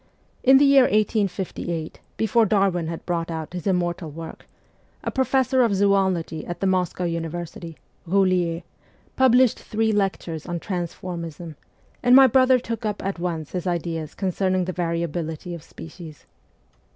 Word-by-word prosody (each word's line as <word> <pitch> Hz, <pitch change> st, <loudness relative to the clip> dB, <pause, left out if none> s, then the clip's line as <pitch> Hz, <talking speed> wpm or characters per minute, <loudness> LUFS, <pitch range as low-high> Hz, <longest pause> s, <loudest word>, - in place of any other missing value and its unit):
In 265 Hz, +1 st, +7 dB
the 285 Hz, -, +5 dB
year 275 Hz, -2 st, +6 dB
1858, 190 Hz, -6 st, -1 dB, 0.2 s
before 220 Hz, +1 st, +3 dB
Darwin 190 Hz, -5 st, +1 dB
had 165 Hz, 0 st, -6 dB
brought 170 Hz, -1 st, -2 dB
out 160 Hz, 0 st, -5 dB
his 180 Hz, +1 st, -5 dB
immortal 175 Hz, -2 st, -1 dB
work, 160 Hz, +2 st, -9 dB, 0.6 s
a -, -, -2 dB
professor 260 Hz, -1 st, +2 dB
of 230 Hz, -5 st, +3 dB
zoology 190 Hz, -5 st, +1 dB
at 175 Hz, -, -6 dB
the -, -, -1 dB
Moscow 185 Hz, -1 st, 0 dB
University, 170 Hz, -1 st, -5 dB, 0.3 s
Boulier, 180 Hz, -2 st, +1 dB, 0.5 s
published 255 Hz, -2 st, +4 dB
three 220 Hz, 0 st, -1 dB
lectures 190 Hz, -6 st, -2 dB
on 175 Hz, -1 st, -3 dB
transformism, 170 Hz, -2 st, -5 dB, 0.5 s
and 245 Hz, +1 st, +5 dB
my 270 Hz, 0 st, +9 dB
brother 260 Hz, +1 st, +5 dB
took 230 Hz, -2 st, -5 dB
up 210 Hz, -2 st, -3 dB
at 195 Hz, -2 st, -3 dB
once 165 Hz, -4 st, -3 dB
his 180 Hz, 0 st, -3 dB
ideas 165 Hz, -3 st, -3 dB
concerning 185 Hz, -1 st, 0 dB
the 185 Hz, -, -3 dB
variability 170 Hz, -1 st, -3 dB
of 170 Hz, -, -7 dB
species. 160 Hz, -1 st, -12 dB
180 Hz, 140 wpm, -23 LUFS, 170-210 Hz, 0.6 s, my